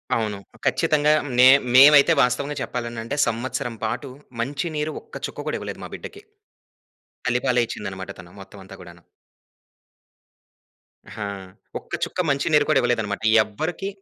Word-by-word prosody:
అవును, 105 -3 -2 0.3
ఖచ్చితంగా 150 0 +2 0.3
నే 130 - +9 0.3
మేమైతే 145 +4 +8
వాస్తవంగా 140 +4 0
చెప్పాలనంటే, 120 0 -4
సంవత్సరం 120 0 -3
పాటు 135 +5 -4 0.3
మంచి 140 +7 -3
నీరు 150 +1 -2
ఒక్క 450 +1 -16
చుక్క - - -9
గూడా - - -1
ఇవ్వలేదు - - -7
మా - - -9
బిడ్డకి. 410 +1 -10 1.0
తల్లి 120 +1 +1
పాలే 125 -2 +3
ఇచ్చిందనమాట 95 -1 -6
తను. 85 -1 -13
మొత్తమంతా 95 0 -13
గూడాను. 85 -1 -14 2.1
ఆ! 105 - -6 0.6
ఒక్క - - -19
చుక్క - - -4
మంచి 140 +3 0
నీరు 150 -1 +5
కూడా - - +4
ఇవ్వలేదనమాట. 110 -4 -1 0.2
ఎవ్వరికి 160 - -5
125 Hz, 130 wpm, -23 LUFS, 110-145 Hz, 2.1 s, నే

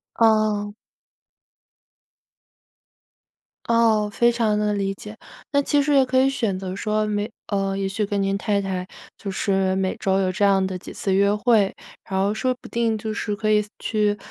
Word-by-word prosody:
哦。 215 -2 +2 2.9
哦， 225 -2 +3
非 235 +3 +3
常 225 -3 +1
地 210 0 +1
理 195 -1 -1
解。 210 +2 -10 0.4
那 285 -1 +3
其 285 +1 +2
实 290 +1 +1
也 275 -1 +6
可 260 0 +2
以 265 +1 +4
选 225 -8 -1
择 185 0 -5
说 215 +1 0
每 210 0 -2 0.2
呃， 195 -1 -1
也 195 0 -1
许 210 +2 -1
跟 200 0 -1
您 195 0 0
太 205 0 0
太 185 -2 -3 0.3
就 200 - -6
是 190 -1 0
每 190 0 -1
周 190 0 +1
有 185 -1 +1
这 205 +3 -2
样 195 -1 +3
的 190 -1 -3
几 180 - -10
次 195 - -1
约 200 +1 +3
会， 210 -2 +2 0.4
然 190 -1 -1
后 200 +2 +1
说 255 +4 0
不 - - -11
定 230 -2 0
就 215 0 -4
是 210 0 -3
可 215 +1 0
以 210 0 +4 0.2
去， 210 -2 0
210 Hz, 195 characters per minute, -23 LUFS, 195-220 Hz, 2.9 s, 也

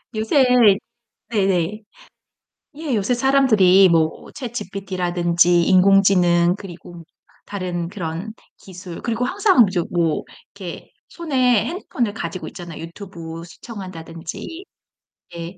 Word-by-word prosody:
요새 220 +6 +3 0.9
네네. 195 -1 0 1.0
예. 305 -4 -3
요새 210 +5 +1
사람들이 220 -8 +5
뭐 160 -1 +1
chatGPT 200 - -6
라든지 175 -1 +3
인공지능 180 -2 +4
그리고 175 -3 -11 0.4
다른 180 -4 -4
그런 185 +2 -5 0.2
기술 180 -2 -10
그리고 235 +1 -1
항상 380 - +4
이제 185 -2 -1
뭐 170 -3 0 0.3
이렇게 185 -4 -8 0.2
손에 255 -9 +1
핸드폰을 255 - -3
가지고 185 -3 -5
있잖아요. 175 -3 -9
유튜브 165 -2 -9
시청한다든지. 185 - -9 0.7
예. 170 +2 -7
190 Hz, 265 characters per minute, -21 LUFS, 175-225 Hz, 1.0 s, 사람들이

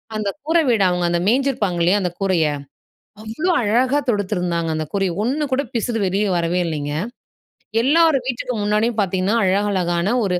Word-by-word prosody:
அந்த 215 -2 -1
கூரை 330 +2 +2
வீடு, 225 -5 +3
அவுங்க 180 -1 0
அந்த 170 0 +1
மேய்ஞ்சிருப்பாங்க 235 -7 +1
இல்லையா 185 +5 +3
அந்த 180 -2 -1
கூரைய, 185 -5 +1 0.8
அவ்வளோ 225 +12 -2
அழகா 245 +6 +2
தொடுத்துருந்தாங்க 180 -6 -1
அந்த 155 0 -2
கூரைய. 195 -2 0
ஒண்ணு 275 +6 -1
கூட 260 +2 +2
பிசுரு 230 0 -1
வெளில 195 +3 0
வரவே 170 +1 0
இல்லைங்க. 145 -3 -3 0.9
எல்லார் 320 +3 +4
வீட்டுக்கு 250 0 -3
முன்னாடியும் 210 +2 0
பாத்தீங்கன்னா, 190 +2 0
அழகழகான 190 -1 +1
ஒரு 185 -3 0
205 Hz, 150 wpm, -20 LUFS, 180-240 Hz, 0.9 s, எல்லார்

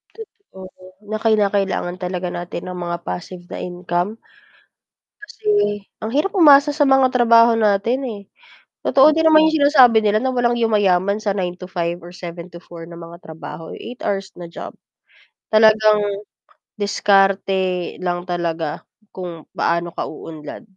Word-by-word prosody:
Totoo 445 - -14 0.5
na 215 - -2
kinakailangan 200 -4 0
talaga 180 0 -3
natin 175 0 -6
ng 180 0 -6
mga 175 0 -3
passive 175 0 -6
na - - -6
income 175 +1 -2 1.1
kasi 415 - -1 0.2
ang 220 +1 -5
hirap 365 +7 +1
umasa 295 -5 +6
sa 290 0 +1
mga 270 -1 +4
trabaho 235 -1 +5
natin, 215 +3 +1
eh, 210 -4 -6 0.6
totoo 275 +2 +6
din 320 0 +1
naman 315 0 +6
yung 315 - -1
sinasabi 255 -6 +6
nila 210 0 +2
na 260 - 0
walang 240 -1 +1
yumayaman 200 -3 +2
sa 215 -2 -2
9-5 180 -2 -4
or 175 - -11
7-4 170 -1 -10
na 170 0 -11
mga 170 0 -11
trabaho 160 0 -9
eh, 235 - -8
8 - - -29
hours 195 -1 -2
na 175 - -8
job. - - -9 0.8
Talagang 215 -1 +5 0.8
diskarte 195 -3 +1
lang 175 -1 -2
talaga 165 -3 -3 0.3
kung 175 -4 -8
paano 170 0 -1
ka - - -3
uunlad 155 +5 -9
195 Hz, 140 wpm, -19 LUFS, 175-235 Hz, 1.1 s, umasa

